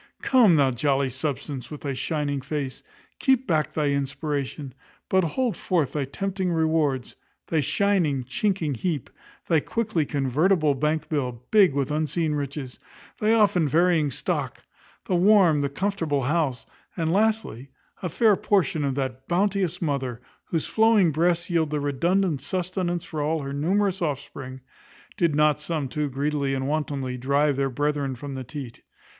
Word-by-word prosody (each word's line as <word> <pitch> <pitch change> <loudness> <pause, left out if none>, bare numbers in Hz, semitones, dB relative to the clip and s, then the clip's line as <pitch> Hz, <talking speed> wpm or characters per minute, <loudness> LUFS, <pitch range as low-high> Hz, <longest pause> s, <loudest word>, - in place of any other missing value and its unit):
Come, 235 -10 +5
thou 140 -3 +4
jolly 135 +1 +1
substance, 135 -1 -4
with 150 - -8
thy 140 -2 -3
shining 145 +1 -2
face, 135 -1 -4 0.4
keep 265 -1 +2
back 155 -6 +1
thy 150 -2 0
inspiration, 140 0 -3 0.4
but 190 0 +3
hold 225 - -1
forth 165 -7 0
thy 145 -2 -1
tempting 190 +5 -2
rewards; 155 -5 0 0.3
thy 160 - +2
shining, 160 -4 +1
chinking 185 - -1
heap; 150 +2 -3 0.4
thy 165 -2 +4
quickly 205 -4 -1
convertible 150 +4 +2
bank 150 +3 -1
bill, 125 -6 -3
big 195 -10 +5
with 140 0 0
unseen 155 +1 0
riches; 140 -2 -5 0.4
thy 215 +1 +3
often 200 -7 +3
varying 165 0 +3
stock; 130 - -3 0.4
the 185 - 0
warm, 180 -5 +5
the 140 - 0
comfortable 165 -4 -1
house; 140 -3 0 0.3
and, 165 -1 0
lastly, 210 - 0 0.3
a 180 - -2
fair 215 +4 +4
portion 190 -6 +1
of 135 -2 -1
that 130 -1 -4
bounteous 185 -1 0
mother, 135 -6 -2 0.3
whose 165 -3 -1
flowing 220 -6 +4
breasts 170 +2 +1
yield 165 -4 0
redundant 150 +3 0
sustenance 180 -2 -2
for 155 -3 -5
all 155 0 0
her 140 0 -5
numerous 190 +6 0
offspring, 135 -4 -4 0.5
did 170 -4 +1
not 150 -1 +3
some 150 -2 -3
too 150 +2 -2
greedily 140 0 -1
and 135 0 -2
wantonly 140 -4 -2
drive 140 +3 +2
their 135 0 0
brethren 145 0 -1
from 140 +3 -7
the 130 -1 -5
teat. 130 -2 -8
150 Hz, 150 wpm, -25 LUFS, 140-180 Hz, 0.5 s, Come